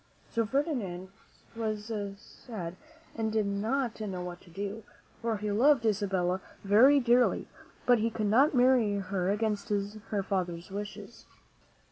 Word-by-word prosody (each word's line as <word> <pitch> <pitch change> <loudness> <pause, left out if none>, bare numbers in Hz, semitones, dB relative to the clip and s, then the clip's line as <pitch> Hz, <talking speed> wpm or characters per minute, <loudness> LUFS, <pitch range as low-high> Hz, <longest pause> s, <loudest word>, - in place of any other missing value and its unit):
So 230 -2 0
Ferdinand 220 - -2 0.5
was 215 -1 -3 0.3
sad 195 -5 -8 0.4
and 220 -1 -1
did 215 -1 +1
not 220 +4 -1
know 190 -4 -4
what 175 0 -7
to - - -18
do, 200 +5 -5 0.4
for 230 -2 0
he 210 0 -2
loved 245 +3 +4
Isabella 190 -3 +1 0.2
very 240 +9 +6
dearly; 245 -1 +3 0.4
but 245 -2 +5
he 225 +2 +1
could 215 -1 -2
not 265 +8 +4
marry 245 -4 +4
her 190 -2 -1
against 210 0 -1
her 205 0 -2
father's 180 -2 -3
wishes. 205 +2 -7
210 Hz, 135 wpm, -30 LUFS, 195-230 Hz, 0.5 s, very